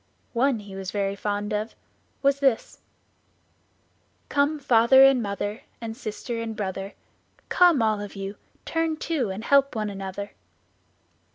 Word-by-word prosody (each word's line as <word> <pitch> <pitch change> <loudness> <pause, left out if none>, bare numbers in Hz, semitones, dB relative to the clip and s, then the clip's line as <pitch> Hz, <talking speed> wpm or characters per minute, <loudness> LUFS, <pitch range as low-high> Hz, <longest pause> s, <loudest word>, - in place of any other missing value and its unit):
One 250 -1 +2
he 200 -2 -10
was 190 -1 -5
very 200 -1 -1
fond 205 +1 -2
of 210 +2 -3 0.5
was 275 0 +3
this: 270 -5 +1 1.5
"Come, 290 +2 +2
father 265 -1 +6
and 270 -2 +6
mother, 205 +1 -3 0.2
And 225 -1 -5
sister 230 0 -5
and 225 -1 -4
brother, 195 -1 -4 0.5
Come, 345 -9 +5
all 215 -2 +1
of 205 0 -8
you, 195 +1 -6 0.3
turn 325 -1 -1
to 305 -9 -1
And 190 +3 -5
help 275 0 +3
one 215 -2 -2
another." 195 +1 -6
220 Hz, 140 wpm, -25 LUFS, 205-270 Hz, 1.5 s, father